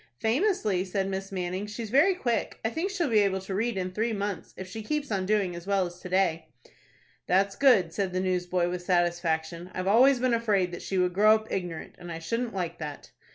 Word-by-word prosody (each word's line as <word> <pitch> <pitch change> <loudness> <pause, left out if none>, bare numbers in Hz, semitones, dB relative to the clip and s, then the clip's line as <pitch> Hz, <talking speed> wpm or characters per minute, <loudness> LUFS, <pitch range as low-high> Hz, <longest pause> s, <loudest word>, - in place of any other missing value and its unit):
"Famously," 225 - +1
said 190 +1 -2
Miss 195 0 -4
Manning. 185 +1 -3
"She's 215 +1 -6
very 310 +9 +5
quick. 240 - -2
I 225 - +1
think 335 +8 -2
she'll 370 -5 -1
be 225 -4 +4
able 195 -2 +2
to 190 +1 -6
read 220 +2 -1
in 185 -1 -2
three 220 +4 -1
months, 200 -3 -4
if 190 - -6
she 220 +4 -7
keeps 290 +3 -3
on 190 -2 -1
doing 200 -4 +1
as 170 +2 -9
well 195 -2 +2
as 175 0 -8
to 180 - -8
day." 180 -3 +1 0.8
"That's 195 +2 +2
good," 205 -12 +4
said 195 -3 -1
the 185 - -1
newsboy, 180 -1 0
with 180 0 -3
satisfaction. 175 -1 0
"I've 185 - -2
always 250 +6 +5
been 255 -1 +2
afraid 205 -6 +1
that 175 - -7
she 195 - -3
would 180 -1 +2
grow 215 +3 +6
up 220 0 -5
ignorant, 175 -4 -4
and 175 -1 -8
I 165 - -4
shouldn't 230 +7 -3
like 175 -3 -3
that." 150 -3 -7
195 Hz, 220 wpm, -28 LUFS, 180-220 Hz, 0.8 s, grow